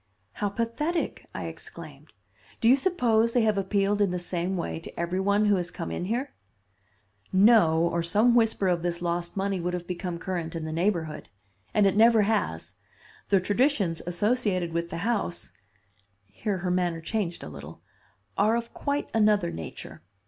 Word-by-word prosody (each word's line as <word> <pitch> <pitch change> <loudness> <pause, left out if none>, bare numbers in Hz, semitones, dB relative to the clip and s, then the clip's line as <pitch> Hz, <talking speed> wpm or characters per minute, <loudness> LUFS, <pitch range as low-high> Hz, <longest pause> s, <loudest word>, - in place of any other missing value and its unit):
"How 205 - -2
pathetic!" 235 - -2
I - - -4
exclaimed. - - -10 0.5
"Do 225 - +2
you 250 - +8
suppose 235 -9 +2
they 245 - +3
have 215 -1 +2
appealed 200 +1 +1
in 200 - +3
the 180 - -2
same 180 +1 -2
way 170 - -3
to 165 - -10
every 175 +2 -1
one 200 +2 +2
who 205 -2 +4
has 175 -1 -2
come 170 - -6
in 175 - -3
here?" 245 +8 -2 1.0
"No, 195 -5 +5
or 170 0 +1
some 210 +8 +3
whisper 225 -4 +2
of 175 -2 +1
this 170 0 -2
lost 175 +1 -2
money 195 -1 0
would 180 +1 -2
have 175 -1 -5
become 180 -1 -4
current 170 -2 -4
in 165 - -3
the 155 - -4
neighborhood. 165 -3 -1 0.4
And 210 - +3
it 195 - +3
never 225 0 +6
has. 200 - -1 0.6
The 195 - +5
traditions 205 - +1
associated 185 -2 0
with 170 0 -2
the 165 - -5
house," 215 -7 -2 0.7
here 190 - -3
her 180 0 -2
manner 175 -2 0
changed 175 0 -3
a - - -7
little, 75 +1 -10 0.6
"are 215 +3 +4
of 235 0 -4
quite 285 0 -2
another 210 - +3
nature. 80 0 -8
190 Hz, 170 wpm, -27 LUFS, 170-220 Hz, 1.0 s, you